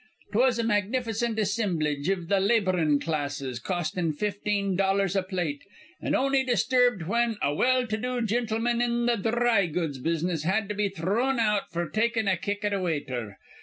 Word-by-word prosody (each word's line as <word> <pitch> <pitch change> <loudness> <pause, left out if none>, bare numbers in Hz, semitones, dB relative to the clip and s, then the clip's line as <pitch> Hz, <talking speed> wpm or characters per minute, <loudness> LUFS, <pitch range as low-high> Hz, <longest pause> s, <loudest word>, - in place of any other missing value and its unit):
'Twas 240 +3 +3
a 235 - 0
magnificent 225 +1 0
assimblage 180 -8 0
iv 180 -3 -1
th' 195 +1 +2
laborin' 185 -8 +2
classes, 145 -5 -3
costin' 175 +3 -2
fifteen 200 +2 -1
dollars 195 0 +1
a 195 - +3
plate, 180 -6 -3 0.4
an' - - 0
on'y 275 0 +2
disturbed 245 -3 +2
whin 230 +5 0
a 145 - 0
well 255 +9 +2
to 215 -2 -2
do 250 +2 -2
gintleman 235 +1 0
in 240 0 +1
th' 235 -4 +1
dhry 225 -5 +2
goods 155 -5 -2
business 165 +3 -1
had 195 +6 0
to 210 - -3
be 205 0 0
thrun 205 +9 0
out 210 -3 +1
f'r 170 0 -2
takin' 225 0 +1
a 190 - +3
kick 205 +4 -3
at 205 - 0
a 200 - 0
waiter. 130 - -3
200 Hz, 170 wpm, -27 LUFS, 170-230 Hz, 0.4 s, Twas